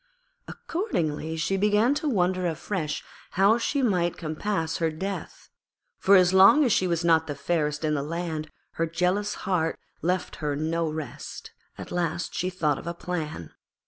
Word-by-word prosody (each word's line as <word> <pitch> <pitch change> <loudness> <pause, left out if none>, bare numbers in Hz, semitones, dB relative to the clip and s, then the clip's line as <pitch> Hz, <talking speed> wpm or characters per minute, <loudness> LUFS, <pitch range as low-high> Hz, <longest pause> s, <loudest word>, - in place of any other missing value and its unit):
Accordingly 160 - -2
she 170 +4 0
began 210 +6 +3
to 295 +1 -1
wonder 185 -5 +1
afresh 165 -1 -3 0.3
how 200 +5 +5
she 275 +3 0
might 180 -7 +1
compass 160 +1 -2
her 165 -1 +1
death; 190 +5 -6 0.5
for 200 - +5
as 185 -1 +5
long 195 +11 +7
as 235 - +3
she 185 - +2
was 170 -1 0
not 160 -1 +4
the 145 - -3
fairest 150 0 -1
in 155 - +1
the 145 - 0
land 160 0 -4 0.3
her 165 - +2
jealous 180 +5 0
heart 170 -4 0 0.2
left 180 +2 -1
her 150 -2 -2
no 160 +2 -1
rest. 155 -1 -7 0.3
At - - -8
last 175 -1 -2
she 180 - -1
thought 155 -6 0
of - - -10
a 170 - -3
plan. 155 - -5
170 Hz, 165 wpm, -26 LUFS, 160-190 Hz, 0.5 s, long